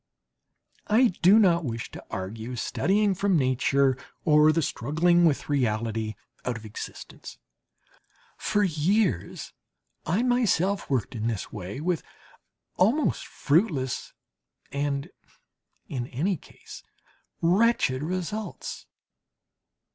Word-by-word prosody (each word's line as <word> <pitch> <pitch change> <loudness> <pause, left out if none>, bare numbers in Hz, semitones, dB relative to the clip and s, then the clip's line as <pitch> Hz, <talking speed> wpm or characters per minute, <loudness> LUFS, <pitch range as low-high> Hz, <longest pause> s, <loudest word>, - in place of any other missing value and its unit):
I 235 +4 +5
do 185 +5 +7
not 175 -6 +4
wish 115 -4 -4
to - - -9
argue 110 +5 -5
studying 200 - +1
from 190 -1 +2
Nature 135 0 +2 0.3
or 150 0 +6
the 165 +1 +1
struggling 170 +8 +2
with 150 -4 +1
reality, 110 -5 -1 0.3
out 125 -2 -2
of 110 - -11
existence; 105 - -9 1.0
for 210 -1 0
years 175 - 0 0.5
I 185 +9 +1
myself 205 -6 +1
worked 130 -5 -1
in 115 -1 -2
this 110 -5 -3
way 100 +6 -6
with 175 0 0 0.8
almost 235 +11 +2
fruitless 145 - 0 0.6
and, 140 0 -2 0.8
in 125 -3 -4
any 170 +11 -1
case, - - -13 0.6
wretched 180 - +3
results. 185 +6 -4
150 Hz, 100 wpm, -26 LUFS, 125-190 Hz, 1.0 s, do